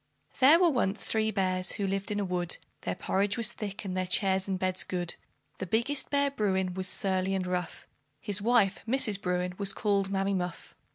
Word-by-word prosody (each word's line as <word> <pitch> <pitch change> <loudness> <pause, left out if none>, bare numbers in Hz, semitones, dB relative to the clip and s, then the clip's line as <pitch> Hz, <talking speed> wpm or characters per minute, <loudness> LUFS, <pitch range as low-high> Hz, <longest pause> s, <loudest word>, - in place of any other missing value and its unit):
There 285 +6 +7
were 350 -2 +4
once 215 -6 0
three 220 0 +1
bears, 185 -3 0
who 200 - -2
lived 195 +1 -2
in 205 -1 -1
a 200 - -1
wood, 180 -2 -1 0.2
Their - - -3
porridge 195 +2 0
was 235 0 +1
thick, 205 -1 -6
and 185 -1 -3
their 185 0 -1
chairs 190 0 +2
and 190 -1 -1
beds 185 0 0
good. 175 -2 -3 0.5
The 185 - -4
biggest 250 +8 0
bear, 280 0 +2
Bruin, 190 -7 0
was 185 0 -2
surly 190 0 0
and 185 -1 -1
rough; 180 -1 -4 0.3
His 200 +6 -1
wife, 215 -3 +3
Mrs. 220 -5 +2
Bruin, 180 0 -1
was 200 -1 +1
called 200 -2 0
Mammy 195 0 0
Muff. 180 -2 -4
195 Hz, 195 wpm, -29 LUFS, 185-215 Hz, 0.5 s, There